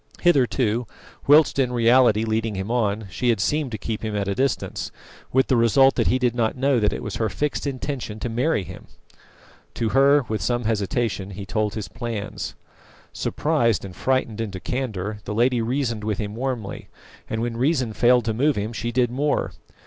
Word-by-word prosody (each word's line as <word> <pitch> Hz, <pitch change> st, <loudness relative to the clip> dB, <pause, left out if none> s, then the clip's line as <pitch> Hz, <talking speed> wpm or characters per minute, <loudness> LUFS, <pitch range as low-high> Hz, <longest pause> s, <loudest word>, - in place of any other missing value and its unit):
Hitherto, 125 Hz, -7 st, +2 dB, 0.4 s
whilst 145 Hz, 0 st, +5 dB
in 125 Hz, -2 st, +2 dB
reality 120 Hz, -2 st, +4 dB
leading 110 Hz, -1 st, -1 dB
him 95 Hz, +4 st, -3 dB
on, 110 Hz, -3 st, 0 dB
she 120 Hz, +9 st, 0 dB
had 115 Hz, -4 st, +2 dB
seemed 145 Hz, +5 st, 0 dB
to -, -, -2 dB
keep 110 Hz, +3 st, -4 dB
him 110 Hz, -1 st, -3 dB
at 100 Hz, -1 st, -1 dB
a 100 Hz, -, 0 dB
distance, 135 Hz, +5 st, -1 dB, 0.4 s
with 130 Hz, +1 st, +3 dB
the 130 Hz, -, +2 dB
result 130 Hz, +4 st, +5 dB
that -, -, 0 dB
he 130 Hz, -, +3 dB
did 125 Hz, -2 st, +1 dB
not 115 Hz, 0 st, 0 dB
know 135 Hz, -1 st, +2 dB
that 105 Hz, -1 st, +2 dB
it -, -, -5 dB
was 105 Hz, -, -4 dB
her 110 Hz, -1 st, 0 dB
fixed 145 Hz, +9 st, -2 dB
intention 130 Hz, -5 st, -4 dB
to 120 Hz, -, -3 dB
marry 120 Hz, +1 st, 0 dB
him. 90 Hz, +1 st, -11 dB, 0.9 s
To 115 Hz, -, 0 dB
her, 140 Hz, +1 st, +4 dB
with 110 Hz, -1 st, -2 dB
some 120 Hz, 0 st, 0 dB
hesitation, 105 Hz, -1 st, -1 dB
he 100 Hz, 0 st, -7 dB
told 105 Hz, 0 st, -1 dB
his 110 Hz, -2 st, -4 dB
plans. 115 Hz, -4 st, -5 dB, 0.6 s
Surprised 120 Hz, -10 st, 0 dB
and 95 Hz, -2 st, -9 dB
frightened 130 Hz, -4 st, 0 dB
into 100 Hz, -4 st, -4 dB
candour, 105 Hz, -4 st, -3 dB
the 105 Hz, -, -4 dB
lady 120 Hz, +1 st, +2 dB
reasoned 120 Hz, -2 st, -1 dB
with 105 Hz, -2 st, -1 dB
him 105 Hz, -1 st, -4 dB
warmly, 120 Hz, -4 st, -4 dB, 0.4 s
and 110 Hz, +1 st, -2 dB
when 120 Hz, -1 st, -2 dB
reason 130 Hz, -2 st, +1 dB
failed 120 Hz, +1 st, +4 dB
to 110 Hz, -, 0 dB
move 140 Hz, +5 st, +2 dB
him 105 Hz, +3 st, -3 dB
she 120 Hz, +1 st, -3 dB
did 120 Hz, 0 st, +1 dB
more. 145 Hz, +3 st, 0 dB
115 Hz, 190 wpm, -23 LUFS, 105-130 Hz, 0.9 s, whilst